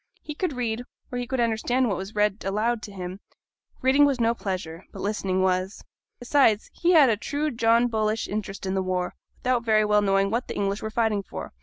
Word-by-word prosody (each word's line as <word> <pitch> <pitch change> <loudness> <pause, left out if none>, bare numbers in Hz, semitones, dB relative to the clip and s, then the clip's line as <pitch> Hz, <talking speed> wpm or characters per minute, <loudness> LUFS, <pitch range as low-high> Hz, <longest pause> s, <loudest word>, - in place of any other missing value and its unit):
He 300 - -6
could 310 0 -2
read, 240 -2 -2 0.3
or 245 - -2
he 245 - -4
could 260 0 -2
understand 240 +2 +1
what 200 - 0
was 190 +4 -7
read 210 0 +1
aloud 215 +4 0
to 210 - -8
him; 185 -1 -6 0.6
reading 265 +3 +5
was 280 -3 +3
no 230 0 +3
pleasure, 185 -5 -5
but - - -10
listening 195 -2 0
was. 185 +1 0 0.3
Besides, 245 -4 +2
he 350 +1 +2
had 290 -7 +7
a - - +2
true 295 +7 -2
John 230 0 +3
Bullish 220 -1 -1
interest 200 -1 -4
in 190 - -1
the 190 - +1
war, 185 -1 -2 0.2
without 250 -2 0
very 215 -2 +3
well 210 0 +3
knowing 195 0 +2
what 235 +3 -1
the - - -5
English 200 0 -1
were 220 - -3
fighting 220 -2 +1
for. 195 - -8
220 Hz, 210 wpm, -25 LUFS, 195-245 Hz, 0.6 s, had